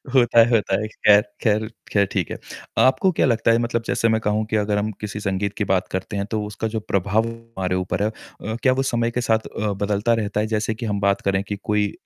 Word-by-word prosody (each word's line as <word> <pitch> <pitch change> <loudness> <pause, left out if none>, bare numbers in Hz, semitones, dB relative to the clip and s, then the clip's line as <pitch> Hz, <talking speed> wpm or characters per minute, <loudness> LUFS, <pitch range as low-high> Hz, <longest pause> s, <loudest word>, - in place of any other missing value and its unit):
होता 120 -2 +5
है, 115 +1 +6
होता 100 -4 +2
है। 110 - -2
खैर, 105 -1 +4 0.2
खैर, 110 -1 +1 0.2
खैर 100 -1 +3
ठीक - - -1
है। - - -4 0.5
आपको 185 +9 +4
क्या - - +2
लगता 115 -2 +2
है, 115 - +4
मतलब 115 0 -2
जैसे 115 - +1
मैं 110 0 +1
कहूँ 105 0 0
कि 110 - 0
अगर 105 -1 +1
हम 105 +1 -1
किसी 105 0 -4
संगीत 100 0 -2
की 105 - 0
बात 95 -1 0
करते 95 +3 -4
हैं, 100 - -1
तो 110 -1 0
उसका 105 +2 -4
जो 110 - +1
प्रभाव 105 +3 0
हमारे 115 -6 -4
ऊपर 95 +2 -1
है, 105 - +2
अ, 110 0 -8
क्या 130 - +5
वो 135 +1 0
समय 120 0 0
के 125 - -1
साथ 110 -1 +1
अ, 105 -1 -3
बदलता 100 +3 0
रहता 105 0 -2
है? 110 - 0
जैसे 110 0 -1
कि 115 +1 -5
हम 100 -2 -1
बात 100 0 +2
करें 95 -1 +1
कि 105 +1 -4
कोई 105 -1 +1
105 Hz, 250 wpm, -22 LUFS, 100-115 Hz, 0.5 s, है